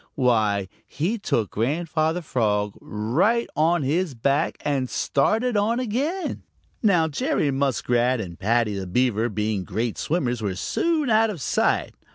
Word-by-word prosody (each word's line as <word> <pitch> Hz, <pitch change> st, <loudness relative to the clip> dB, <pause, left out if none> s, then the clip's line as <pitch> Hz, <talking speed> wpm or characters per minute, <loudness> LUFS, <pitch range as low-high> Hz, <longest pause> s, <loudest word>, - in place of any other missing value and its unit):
Why, 110 Hz, -7 st, +2 dB, 0.2 s
he 195 Hz, +10 st, -2 dB
took 115 Hz, -, -1 dB
Grandfather 160 Hz, +7 st, 0 dB
Frog 105 Hz, -7 st, 0 dB
right 150 Hz, -, +1 dB
on 165 Hz, +1 st, +2 dB
his 155 Hz, +2 st, 0 dB
back 140 Hz, +6 st, 0 dB
and 135 Hz, -3 st, 0 dB
started 220 Hz, -, +1 dB
on 215 Hz, +4 st, +1 dB
again. 275 Hz, -, -2 dB, 0.4 s
Now 180 Hz, -7 st, +3 dB
Jerry 160 Hz, -, 0 dB
Muskrat 130 Hz, -2 st, +1 dB
and 90 Hz, -5 st, -7 dB
Paddy 110 Hz, +1 st, +1 dB
the 95 Hz, -1 st, -4 dB
Beaver, 120 Hz, +2 st, +1 dB
being 105 Hz, -2 st, -1 dB
great 110 Hz, +5 st, -3 dB
swimmers, 125 Hz, -8 st, -1 dB
were 100 Hz, -3 st, -2 dB
soon 310 Hz, -, 0 dB
out 220 Hz, +1 st, +4 dB
of 195 Hz, -6 st, -5 dB
sight. -, -, 0 dB
135 Hz, 140 wpm, -24 LUFS, 110-185 Hz, 0.4 s, out